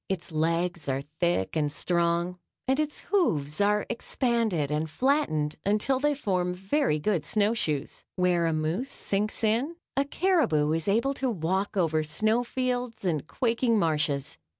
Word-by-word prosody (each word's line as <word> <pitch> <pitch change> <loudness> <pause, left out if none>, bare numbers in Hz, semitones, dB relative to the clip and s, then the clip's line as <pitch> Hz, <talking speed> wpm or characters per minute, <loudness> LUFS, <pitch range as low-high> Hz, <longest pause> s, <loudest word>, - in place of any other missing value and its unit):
Its 185 -2 -3
legs 165 0 0
are 135 +1 -1 0.2
thick 170 - +1
and 150 -2 +1
strong 170 +2 0 0.3
and 265 +2 +2
its 305 -1 -2
hoofs 155 - +1
are 210 +1 +2
expanded 230 - 0
and 155 +1 -1
flattened 155 - +1
until 215 +6 +1
they 295 +1 +2
form 180 -8 -1
very 195 - +1
good 170 0 0
snowshoes. 205 -9 -1
Where 180 -2 +2
a 165 - +1
moose 160 - -1
sinks 210 +3 -1
in, 235 +10 +1 0.2
a 275 - +3
caribou 280 - +2
is 165 +2 -1
able 235 +7 +2
to 265 -1 -1
walk 190 +1 -1
over 160 -3 +2
snowfields 240 +6 -1
and 155 -4 -1
quaking 235 0 +1
marshes. 150 -5 0
190 Hz, 145 wpm, -27 LUFS, 160-240 Hz, 0.3 s, a